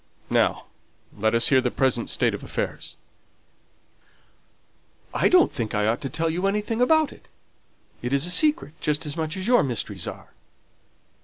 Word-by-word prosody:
Now - - +1 0.5
let 110 +2 +1
us 115 0 +4
hear 130 -2 +4
the 125 - 0
present 130 +1 0
state - - +1
of - - -6
affairs." - - -5 2.2
"I - - +2
don't 360 -1 +5
think 110 -5 -3
I 105 0 +1
ought 110 +2 0
to 135 - -3
tell 165 +6 -1
you 175 +4 -1
anything 210 +3 -1
about 315 +3 +3
it. - - -20 0.7
It 125 - -4
is 140 +2 +2
a 180 - -1
secret, 240 - +2
just 150 +1 0
as 145 0 -4
much 160 +2 -3
as 190 - -4
your 245 +2 +4
mysteries 105 - -2
are." - - -8
150 Hz, 165 wpm, -24 LUFS, 120-200 Hz, 2.2 s, don't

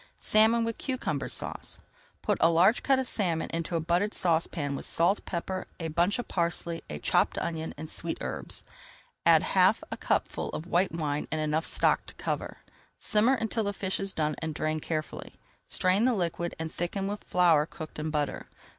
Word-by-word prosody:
SALMON 225 +2 +4
WITH 230 -1 -4
CUCUMBER 250 - -2
SAUCE - - -2 0.5
Put - - +1
a 165 - +6
large 175 +7 +4
cut 270 -1 +3
of 260 - 0
salmon 175 -9 0
into 165 +1 -2
a - - +2
buttered 175 +6 +1
saucepan 160 -4 +1
with - - -5
salt, 175 +5 +3
pepper, 185 +1 -3
a 165 -1 -3
bunch 175 +7 +2
of 245 - -4
parsley, 170 -1 -1
a 75 - -4
chopped - - +2
onion, 160 -1 -3
and 155 +2 -6
sweet 165 +1 -4
herbs. - - -5 0.6
Add - - +6
half - - +3
a - - -3
cupful - - -1
of 155 - -4
white 180 +2 +2
wine 150 -3 -2
and 155 - -1
enough 155 +1 0
stock - - +2
to - - -10
cover. - - -4 0.3
Simmer 225 +5 +3
until 225 -1 -1
the 200 - -1
fish 190 -1 -2
is 195 0 0
done 155 -3 0
and 160 -2 -4
drain 155 +1 -1
carefully. 155 0 -4 0.3
Strain 185 +5 +2
the 255 -2 +3
liquid 170 -2 -2
and 160 0 -5
thicken 185 +3 -2
with 205 +1 -4
flour 165 -4 +4
cooked 160 -2 -8
in 155 +1 -2
butter. 150 -2 -2
170 Hz, 185 wpm, -29 LUFS, 160-200 Hz, 0.6 s, a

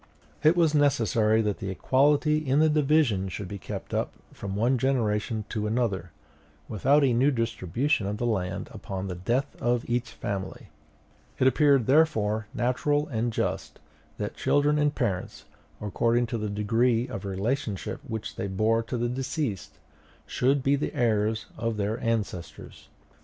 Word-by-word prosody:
It 155 +4 +4
was 165 -3 +3
necessary 115 -6 +3
that 105 -2 -1
the 95 - -4
equality 145 +9 +2
in 140 -3 0
the 155 +1 +5
division 145 -10 +2
should 95 +2 -5
be 100 +1 -7
kept - - -7
up - - -1 0.2
from 100 -1 -5
one 120 +5 +2
generation 110 -4 0
to 105 -1 -2
another, 105 -6 -1 0.6
without 140 +7 +3
a 130 -3 +3
new 130 +5 +4
distribution 115 - 0
of 105 +1 -3
the 120 - -2
land 95 -5 -2
upon 95 -1 -5
the 90 - -3
death 120 +11 -1
of 120 0 0
each 120 0 -1
family; 95 -2 -5 0.7
it - - +2
appeared 140 -2 +4
therefore 110 -8 +2
natural 145 +5 0
and 120 -2 -1
just - - -3 0.4
that - - -4
children 145 +1 +2
and 150 0 +1
parents, 100 -8 -3 0.3
according 115 +3 +1
to 115 -1 -3
the 105 0 -2
degree 115 +4 +1
of 110 -6 -6
relationship 100 +2 -3
which 110 -1 -6
they 100 - -2
bore 110 +4 +1
to 115 +2 -4
the 120 +1 0
deceased, 130 - -3 0.5
should 135 +2 +1
be 140 +1 +3
the 140 - -3
heirs 110 -2 +1
of 115 -1 -1
their 105 +2 -1
ancestors. 110 -7 -4
115 Hz, 155 wpm, -27 LUFS, 105-135 Hz, 0.7 s, the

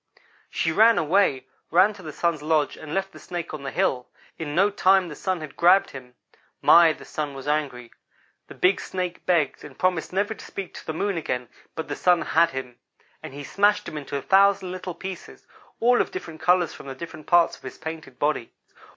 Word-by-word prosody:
"She 165 - -1
ran 225 +6 +5
away; 160 -5 +2 0.2
ran 190 +6 +4
to 200 - -13
the 155 -3 -7
Sun's 165 0 -1
lodge 155 -1 +1
and 155 - -10
left 195 +2 -2
the - - -13
Snake 170 -2 -6
on 155 - -6
the 135 - -4
hill. 125 -1 -1 0.3
In 150 -2 -4
no 200 +4 +4
time 190 -2 +3
the 150 - -8
Sun 185 0 -2
had 155 - -8
grabbed 180 +3 +4
him. 125 -2 -11 0.4
My, 170 -1 +7
the - - -9
Sun 145 -2 -4
was 135 +1 -8
angry! 140 -6 -2 0.6
The - - -12
big 185 +2 +2
Snake 180 -1 -4
begged, 170 -5 +1
and 145 -3 -12
promised 180 -3 0
never 200 +3 0
to - - -13
speak 195 -2 -7
to - - -10
the - - -1
Moon 195 +3 -1
again, 125 -6 -3 0.3
but 160 - -5
the - - -4
Sun 180 -2 +3
had 170 - +3
him; 125 -3 -7 0.4
and 135 - -9
he 145 - -7
smashed 205 +8 +2
him - - -7
into 140 -1 -4
thousands 195 0 +4
of 180 - -5
little 185 -1 -6
pieces, 190 +1 -9 0.3
all 245 +1 +4
of - - -2
different 165 -4 -8
colors 175 0 +3
from - - -11
the 135 - -6
different 160 +1 -9
parts 175 -1 +4
of - - -20
his - - -9
painted 160 -5 -8
body. 145 -5 -1
165 Hz, 210 wpm, -24 LUFS, 150-185 Hz, 0.6 s, My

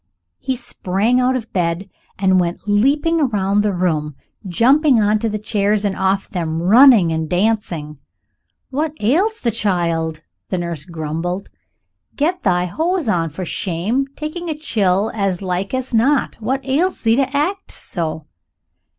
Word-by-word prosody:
He 265 -1 -2
sprang 230 0 0
out 255 +1 +2
of 230 -3 -5
bed 175 +1 -1 0.3
and 190 -1 +3
went 175 -1 -1
leaping 285 +11 +2
round 200 -1 +1
the 210 0 +1
room, 160 -5 -1 0.3
jumping 260 - +4
on 210 0 +2
to 215 -1 -1
chairs 210 0 0
and 195 -2 0
off 190 +1 0
them, 165 -5 -3
running 215 -1 +6
and 160 -1 -2
dancing. 175 -7 -1 0.7
"What 300 +3 -1
ails 365 - +1
the 235 - +1
child?" 170 -7 -1 0.3
the 185 - -1
nurse 170 -4 -4
grumbled; 170 +3 -4 0.6
"get 345 +5 0
thy 180 -2 +1
hose 325 - -1
on, 170 -6 +1
for 180 +5 -6
shame, 200 +11 -1
taking 330 +3 -5
a 310 - -3
chill 205 -8 +1
as 195 -3 -1
like 185 +1 -2
as 260 -1 -3
not. 265 +6 +2
What 265 +4 -2
ails 320 +8 0
thee 225 0 +3
to 275 +1 0
act 375 +7 -1
so?" 160 -3 -4
205 Hz, 150 wpm, -19 LUFS, 175-260 Hz, 0.7 s, running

